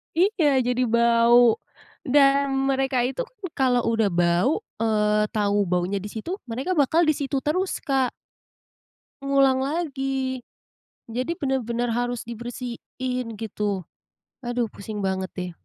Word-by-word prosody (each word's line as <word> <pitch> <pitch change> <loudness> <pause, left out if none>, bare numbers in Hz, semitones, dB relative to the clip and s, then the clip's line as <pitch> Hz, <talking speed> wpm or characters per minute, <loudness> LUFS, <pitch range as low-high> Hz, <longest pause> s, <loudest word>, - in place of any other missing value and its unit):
Iya, 330 -7 +3
jadi 250 0 0
bau 235 0 +5 0.5
dan 275 0 +4 0.2
mereka 265 -1 +1
itu 265 - -1
kan 425 -4 -30
kalau 250 -2 +3
udah 225 -2 +2
bau, 175 - +2 0.2
eee, 210 -1 +2
tau 205 -1 +1
baunya 180 +2 0
di 195 - -6
situ, 280 - -5
mereka 265 +10 -3
bakal 300 +4 +3
di 310 -2 +4
situ 275 -1 -2
terus, 365 +7 -1
Kak. 270 -4 +1 1.1
Ngulang 275 -1 +3
lagi, 270 -4 -2 0.7
jadi 255 +8 -2
bener-bener 245 -5 -1
harus 245 +1 -1
dibersihin 245 +1 -5
gitu, 205 -3 -2 0.6
aduh 240 -3 -2
pusing 205 0 -6
banget 190 -1 -1
deh. 180 -1 -4
245 Hz, 125 wpm, -24 LUFS, 225-275 Hz, 1.1 s, bau